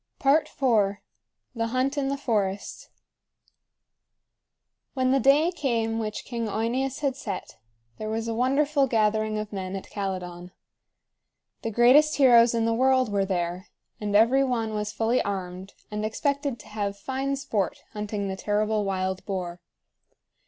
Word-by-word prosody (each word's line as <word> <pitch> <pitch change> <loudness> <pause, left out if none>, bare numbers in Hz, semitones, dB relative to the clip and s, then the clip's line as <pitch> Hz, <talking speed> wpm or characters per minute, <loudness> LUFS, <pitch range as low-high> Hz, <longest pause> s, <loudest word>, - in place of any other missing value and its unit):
IV. 290 +4 +4 1.1
THE 230 0 -1
HUNT 255 +4 0
IN 280 -2 0
THE 280 +1 -1
FOREST. 205 -7 -2 2.1
When 255 -1 +2
the 270 - +4
day 290 +6 +4
came 230 -9 -1
which 215 -1 -4
King 235 -2 -3
OEneus 245 +6 -1
had 275 -3 0
set, 205 -8 -6 0.4
there 215 - -4
was 225 +1 -2
a 230 - -1
wonderful 275 +4 +2
gathering 215 -2 +1
of 215 0 -5
men 190 -1 -4
at 195 - -8
Calydon. 180 -3 -5 1.1
The 225 - -2
greatest 255 +7 +5
heroes 240 -4 +6
in 225 -1 +1
the 230 - +2
world 260 -1 +3
were 200 -1 +1
there; 180 0 -2 0.3
and 205 -1 -2
every 240 +6 +5
one 230 -4 -1
was 210 0 -2
fully 230 +4 +1
armed, 190 -1 -5 0.2
and 210 0 -3
expected 280 +4 -1
to - - -16
have 205 -1 -3
fine 270 +5 -2
sport 215 -9 -2
hunting 210 -1 -3
the 190 - -3
terrible 210 +2 0
wild 190 -1 -2
boar. 180 -3 -4
225 Hz, 145 wpm, -26 LUFS, 200-260 Hz, 2.1 s, heroes